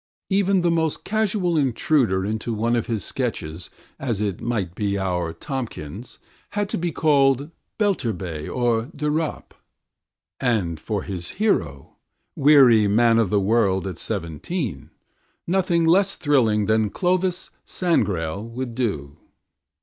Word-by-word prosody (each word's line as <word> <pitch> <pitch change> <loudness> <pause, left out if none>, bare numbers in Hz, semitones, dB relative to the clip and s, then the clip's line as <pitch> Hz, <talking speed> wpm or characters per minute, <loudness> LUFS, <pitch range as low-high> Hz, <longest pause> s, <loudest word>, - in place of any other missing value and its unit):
Even 195 -1 +3
the 175 -1 +2
most 160 -2 0
casual 205 -5 0
intruder 125 -7 +1
into 110 +2 -2
one 115 +3 +1
of 115 - -1
his 115 -3 -1
sketches, 90 -10 -3 0.3
as 120 -7 -1
it 100 -4 -2
might 105 -7 -2
be 100 0 -1
our 90 -3 -1
Tomkins, 115 - -6 0.4
had 205 -1 -1
to - - -2
be 170 0 -1
called 140 -2 +2 0.3
Belturbet 95 - -1
or 120 0 0
de 150 +1 -1
Ropp, 155 0 -3 0.9
and 100 - 0
for 100 +4 -3
his 90 -3 -5
hero, 80 - -1 0.4
weary 135 -7 +6
man 115 +2 +4
of 110 -5 +2
the 105 - +2
world 100 -2 +2
at 90 -4 -5
seventeen, 95 - -3 0.6
nothing 175 -2 +1
less 190 +4 +3
thrilling 120 -9 +2
than 110 0 +2
Clovis 185 - 0
Sangrail 100 - 0
would 120 +1 -5
do. 80 - -3
115 Hz, 130 wpm, -23 LUFS, 100-155 Hz, 0.9 s, weary